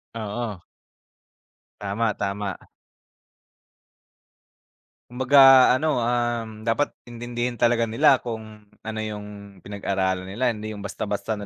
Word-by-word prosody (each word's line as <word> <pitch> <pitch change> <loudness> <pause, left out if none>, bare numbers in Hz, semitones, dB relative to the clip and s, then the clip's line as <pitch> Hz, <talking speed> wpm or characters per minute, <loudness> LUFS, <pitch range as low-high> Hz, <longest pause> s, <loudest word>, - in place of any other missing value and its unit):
Oo. 110 -2 -4 1.2
Tama, 105 +2 -1
tama. 100 -1 -3 2.6
Kumbaga 130 +3 +2 0.4
ano, 155 - -1 0.2
um, 120 -2 -2
dapat 130 +6 +1 0.2
intindihin 120 0 -4
talaga 115 -1 +3
nila 135 +5 +4
kung 110 -2 -7 0.2
ano 110 0 -5
yung 105 -1 -6 0.4
pinag-aralan 95 -2 -2
nila 115 +7 -1
hindi 110 -1 -5
yung 100 - -8
basta-basta 105 +1 -3
na 105 - -7
110 Hz, 100 wpm, -24 LUFS, 105-120 Hz, 2.6 s, nila